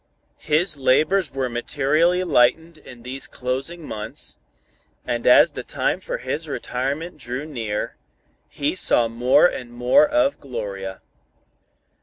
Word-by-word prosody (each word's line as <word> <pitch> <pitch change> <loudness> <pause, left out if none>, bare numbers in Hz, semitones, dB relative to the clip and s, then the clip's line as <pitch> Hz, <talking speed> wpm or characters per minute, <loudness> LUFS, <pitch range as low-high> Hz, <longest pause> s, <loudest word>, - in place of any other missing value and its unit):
His 155 +2 +1
labors 155 +7 +2
were 135 -1 -2
materially 150 +8 +1
lightened 160 +2 +2
in 125 -5 -13
these 130 +2 -7
closing 135 +6 -4
months, 110 +7 -6 0.7
and - - -2
as - - +7
the - - -6
time - - -1
for - - -4
his 160 - -4
retirement 145 +5 -3
drew 125 +3 -5
near, 115 -8 -4 0.5
he 145 +4 -2
saw 120 -9 +3
more 120 +6 +4
and 125 -8 -1
more 125 - +4
of 295 -1 +1
Gloria. 100 - -6
135 Hz, 125 wpm, -22 LUFS, 120-165 Hz, 0.7 s, as